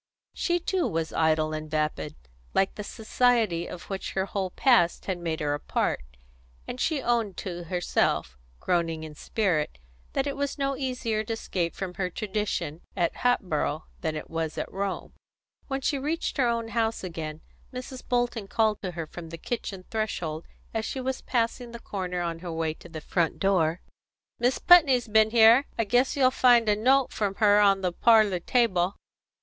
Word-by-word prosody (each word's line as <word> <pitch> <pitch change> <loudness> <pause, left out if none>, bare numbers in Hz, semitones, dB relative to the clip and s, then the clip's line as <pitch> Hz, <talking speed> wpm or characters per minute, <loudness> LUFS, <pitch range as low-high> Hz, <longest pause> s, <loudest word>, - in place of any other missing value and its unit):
She 350 -1 0
too 360 +1 0
was 160 -1 -2
idle 155 -1 +2
and 155 0 -5
vapid, 150 - -2 0.4
like 195 - +2
the 210 - -6
society 220 -5 +1
of 180 - -8
which 195 -1 -5
her 190 0 0
whole 195 -1 -2
past 205 -5 +3
had 185 -2 -2
made 165 -2 -3
her 145 -1 0
a 145 - -2
part, - - -1 0.7
and 250 - -6
she 300 -5 0
owned 230 -6 0
to 175 -2 -5
herself, 175 - 0 0.2
groaning 165 -3 0
in 155 -1 -8
spirit, 165 - -1 0.4
that 270 - 0
it 280 - -2
was 280 +1 -2
no 275 -1 0
easier 250 -5 -2
to 225 - -2
escape 180 -6 -2
from 190 -2 -4
her 180 0 -2
tradition 190 -5 -3 0.2
at 170 -2 0
Hatboro' 160 -10 0 0.2
than 160 -2 -2
it 155 - -5
was 165 -1 -3
at - - -4
Rome. 195 0 -3 0.5
When 270 -1 -2
she 280 +1 0
reached 310 +5 -2
her 260 -3 +3
own 230 -1 -1
house 225 -2 -1
again, 160 -3 -5 0.3
Mrs. 255 0 -7
Bolton 240 -4 -1
called 220 0 +1
to 185 -2 -4
her 165 -1 -4
from 165 +1 -9
the 165 - -7
kitchen 195 -2 -5
threshold 175 -8 -3 0.3
as 225 -1 -1
she 265 - -4
was 260 0 -3
passing 235 0 -1
the 235 - -7
corner 180 -5 -4
on 170 -1 -3
her 175 0 -6
way 160 -1 -1
to 175 - -15
the 160 -2 -7
front 170 +1 0
door: 180 -4 +1 0.6
"Mis' 245 +2 +2
Putney's 275 -9 +6
b'en 220 0 +4
here. 230 +4 +6
I 230 - +2
guess 245 +6 +2
you'll 260 -2 +5
find 245 -3 +5
a 210 - +4
note 260 +5 +3
from 200 -2 -1
her 205 -1 +5
on 200 -2 +4
the 180 -2 0
parlour 215 -3 +4
table." 190 -3 +1
200 Hz, 180 wpm, -27 LUFS, 170-240 Hz, 0.7 s, Putney's